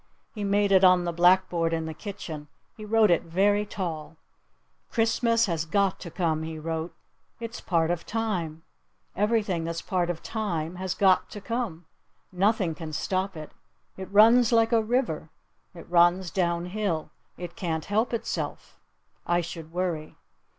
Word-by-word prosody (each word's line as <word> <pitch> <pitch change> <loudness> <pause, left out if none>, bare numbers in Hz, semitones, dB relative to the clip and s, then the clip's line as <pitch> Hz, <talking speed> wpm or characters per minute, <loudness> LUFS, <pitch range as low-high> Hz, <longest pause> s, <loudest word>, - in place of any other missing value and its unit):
He 210 - -5
made 200 0 +2
it 190 -1 +5
on 180 -1 +6
the 170 -1 -2
blackboard 175 -1 +3
in 160 -1 -1
the 160 - -5
kitchen. 155 -5 -7 0.3
He 215 - -10
wrote 215 -1 +4
it 170 - +4
very 205 +5 +1
tall. 165 -6 -5 0.7
"Christmas 230 0 +2
has 165 -5 -1
got 195 +3 +1
to 175 - -7
come," 160 -2 -1
he 160 0 -5
wrote. 165 +1 -4 0.4
"It's 230 0 -6
part 165 -2 +1
of 175 -1 -2
time. 180 -8 -3 0.5
Everything 210 -5 +1
that's 165 0 -4
part 180 -2 0
of 170 -2 -4
time 180 -7 -3
has 185 0 -3
got 190 -2 +3
to 205 - -8
come. 205 -6 -4 0.5
Nothing 190 -2 +1
can 155 -1 -7
stop 190 +3 -2
it. 155 -1 -8 0.4
It 190 0 -8
runs 225 +3 +6
like 225 0 +4
a 230 -1 +4
river. 220 - -1 0.5
It 170 - -11
runs 175 +1 +3
down 170 -2 0
hill. 195 -8 -2 0.3
It 175 -1 -7
can't 165 -7 -3
help 215 +4 0
itself. 235 - -4 0.5
I 175 0 +2
should 165 -1 -8
worry." 170 -3 -3
180 Hz, 155 wpm, -27 LUFS, 165-210 Hz, 0.7 s, on